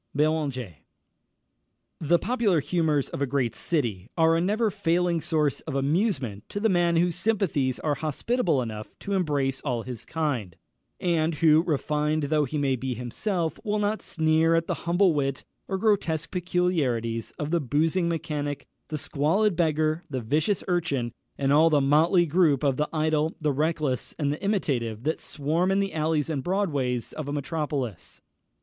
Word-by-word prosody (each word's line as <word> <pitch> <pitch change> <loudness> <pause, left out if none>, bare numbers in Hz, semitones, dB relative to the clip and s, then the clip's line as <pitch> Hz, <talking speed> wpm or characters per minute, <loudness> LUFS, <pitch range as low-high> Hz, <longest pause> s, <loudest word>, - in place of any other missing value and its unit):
Beranger. 150 -3 +1
[Illustration: 90 - -11 1.2
T] 155 - -6
The 175 - +5
popular 225 -5 +1
humours 155 -2 0
of - - -6
a 140 - +1
great 130 -3 0
city 115 - -2
are 165 0 +4
a 165 - +2
never 210 +4 +1
failing 175 -3 +1
source 150 -3 0
of 155 - -6
amusement 135 - 0
to 205 - -4
the 220 +2 +2
man 175 -2 +2
whose 175 +1 +2
sympathies 160 - 0
are 150 - +1
hospitable 155 - 0
enough 110 -2 -7
to 200 - -3
embrace 145 -8 0
all 125 -5 -2
his 125 -2 -7
kind, 130 - -2 0.4
and 165 -2 +1
who, 155 0 +5
refined 150 -1 0
though 150 +1 +2
he 150 +3 -4
may 140 -2 +1
be 130 0 -3
himself, 160 - -2
will 210 -2 0
not 210 +1 0
sneer 160 +1 +2
at 165 0 +1
the - - -1 0.2
humble 175 0 +4
wit 135 -2 -2 0.2
or 190 - -1
grotesque 180 -6 0
peculiarities 150 - 0
of 150 0 -3
the 170 -1 +2
boozing 160 +6 +1
mechanic, 150 -4 -3 0.2
the 155 - -3
squalid 165 +8 +1
beggar, 155 0 +1
the 130 -3 -2
vicious 150 - 0
urchin, 145 -10 -1 0.2
and 140 0 +1
all 160 +3 +6
the 150 -2 +4
motley 160 +6 +4
group 155 -4 +3
of 140 -2 +2
the 150 - 0
idle, 155 0 0
the 150 -3 0
reckless, 150 -3 -1
and 145 -2 0
the 150 - -8
imitative 130 - -1
that 155 +3 -1
swarm 155 +5 -1
in 195 - +2
the 195 -3 -1
alleys 155 -1 0
and 145 -5 -2
broadways 145 - -1
of 155 -3 -5
a - - -3
metropolis. 145 - -3
155 Hz, 170 wpm, -26 LUFS, 140-175 Hz, 1.2 s, all